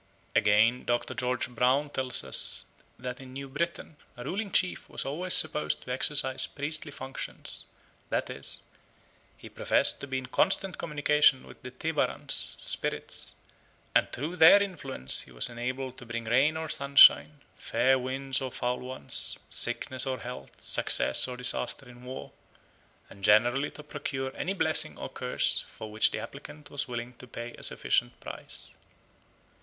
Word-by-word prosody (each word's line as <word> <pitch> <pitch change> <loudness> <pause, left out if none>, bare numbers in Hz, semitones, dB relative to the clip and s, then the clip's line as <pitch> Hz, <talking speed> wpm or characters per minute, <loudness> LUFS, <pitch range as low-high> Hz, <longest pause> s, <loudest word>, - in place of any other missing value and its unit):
Again, 110 +4 +4
Dr. 120 +1 -1
George 125 0 -1
Brown 130 +4 +1
tells 130 -2 +1
us - - +2 0.3
that 125 +1 -6
in 130 -1 -12
New 135 +1 -6
Britain 160 +2 -4 0.2
"a 120 - -7
ruling 200 - -3
chief 180 0 0
was - - -4
always 175 +7 +1
supposed 75 0 +2
to 125 - -7
exercise 130 0 +2
priestly 150 +2 -3
functions, 130 0 -7 0.4
that - - -1
is, - - -1 0.7
he - - -12
professed - - +2
to 140 - -6
be 130 -1 -2
in 130 - -4
constant 185 +8 +1
communication 150 -3 +3
with - - -15
the 125 - -7
tebarans 150 +4 -1
(spirits), - - -3 0.6
and - - +3
through 155 +8 -4
their 165 +6 +8
influence 140 - +1
he - - -12
was - - +2
enabled 130 +2 -5
to 120 - -12
bring 115 0 -4
rain 135 +7 +3
or 160 0 -4
sunshine, 140 +1 +6 0.2
fair 130 0 +2
winds 135 +2 -2
or 130 -1 -4
foul 125 +1 -2
ones, 130 +1 -1
sickness 130 +1 0
or 130 -2 -3
health, 125 +1 -8
success - - +2
or 125 -1 -6
disaster 125 +1 0
in 125 0 -14
war, 130 +1 -8 0.8
and 100 0 -15
generally 120 +7 +4
to 150 - -12
procure 135 -3 -5
any 190 - -2
blessing 160 -5 +1
or - - -6
curse - - 0
for 110 -1 -10
which 110 +1 +4
the - - -4
applicant 150 -1 -10
was 145 0 -3
willing 120 0 -5
to 125 - -12
pay 120 0 -7
a - - -13
sufficient - - 0
price." - - -9
130 Hz, 155 wpm, -28 LUFS, 125-145 Hz, 0.8 s, their